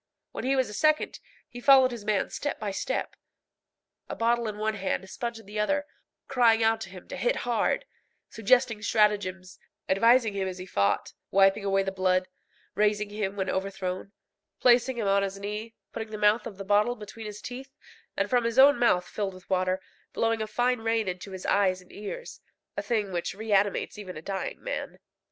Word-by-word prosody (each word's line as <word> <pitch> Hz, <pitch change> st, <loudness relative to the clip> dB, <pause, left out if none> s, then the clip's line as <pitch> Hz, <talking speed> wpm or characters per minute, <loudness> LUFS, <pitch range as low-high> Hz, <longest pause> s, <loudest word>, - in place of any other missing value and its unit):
When -, -, -5 dB
he 270 Hz, +1 st, +2 dB
was 260 Hz, -1 st, +2 dB
a 210 Hz, -, -8 dB
second, 310 Hz, +7 st, +1 dB, 0.3 s
he 245 Hz, -, -10 dB
followed 265 Hz, -1 st, +7 dB
his 235 Hz, -3 st, -7 dB
man 205 Hz, -2 st, 0 dB
step 290 Hz, -, -3 dB
by 210 Hz, -2 st, -3 dB
step, 195 Hz, -, -3 dB, 0.9 s
a -, -, -4 dB
bottle 235 Hz, 0 st, +1 dB
in 210 Hz, -1 st, -4 dB
one 215 Hz, +1 st, 0 dB
hand, 195 Hz, -2 st, -2 dB
a -, -, -12 dB
sponge 235 Hz, +3 st, -4 dB
in 225 Hz, -, -13 dB
the 210 Hz, +1 st, -5 dB
other, 290 Hz, +7 st, +1 dB, 0.4 s
crying 235 Hz, -4 st, +4 dB
out 225 Hz, 0 st, +2 dB
to 190 Hz, -, -6 dB
him 185 Hz, -1 st, -12 dB
to -, -, -5 dB
hit 235 Hz, +6 st, +1 dB
hard, 240 Hz, -, +1 dB, 0.4 s
suggesting 225 Hz, 0 st, +2 dB
stratagems, 200 Hz, -4 st, +1 dB, 0.3 s
advising 230 Hz, +3 st, +4 dB
him 195 Hz, -1 st, -1 dB
as 185 Hz, -1 st, -5 dB
he 185 Hz, -, -7 dB
fought, 100 Hz, -, 0 dB, 0.2 s
wiping 195 Hz, +1 st, +4 dB
away 195 Hz, -1 st, +2 dB
the 195 Hz, -, -2 dB
blood, 185 Hz, -1 st, +1 dB, 0.5 s
raising 210 Hz, 0 st, +1 dB
him 205 Hz, -2 st, -3 dB
when 190 Hz, -1 st, -2 dB
overthrown, 190 Hz, 0 st, -3 dB, 0.5 s
placing 245 Hz, 0 st, +4 dB
him 225 Hz, -, -1 dB
on 200 Hz, 0 st, +4 dB
his 195 Hz, 0 st, -3 dB
knee, 210 Hz, +3 st, -5 dB, 0.2 s
putting 220 Hz, -1 st, -5 dB
the 215 Hz, -, -5 dB
mouth 210 Hz, +2 st, +3 dB
of 195 Hz, -, -9 dB
the 195 Hz, -, -7 dB
bottle 210 Hz, +4 st, +3 dB
between 215 Hz, 0 st, -9 dB
his 210 Hz, 0 st, -7 dB
teeth, 265 Hz, +5 st, -8 dB, 0.4 s
and -, -, +1 dB
from 245 Hz, -2 st, +2 dB
his 230 Hz, +1 st, -2 dB
own 280 Hz, +2 st, +7 dB
mouth, 180 Hz, -7 st, +3 dB
filled 200 Hz, -3 st, -3 dB
with 185 Hz, -, -15 dB
water, 185 Hz, 0 st, +1 dB, 0.3 s
blowing 225 Hz, -1 st, +1 dB
a 215 Hz, -, -2 dB
fine 245 Hz, +3 st, +1 dB
rain 225 Hz, -1 st, 0 dB
into 185 Hz, +2 st, -5 dB
his 190 Hz, -1 st, -8 dB
eyes 190 Hz, -2 st, +2 dB
and 180 Hz, -, -18 dB
ears 345 Hz, -, -7 dB, 0.3 s
a -, -, -2 dB
thing 215 Hz, -5 st, -1 dB
which 175 Hz, +1 st, -3 dB
reanimates 205 Hz, -1 st, 0 dB
even 185 Hz, -5 st, -7 dB
a -, -, -7 dB
dying 195 Hz, +1 st, -4 dB
man. -, -, -4 dB
210 Hz, 195 wpm, -27 LUFS, 195-235 Hz, 0.9 s, followed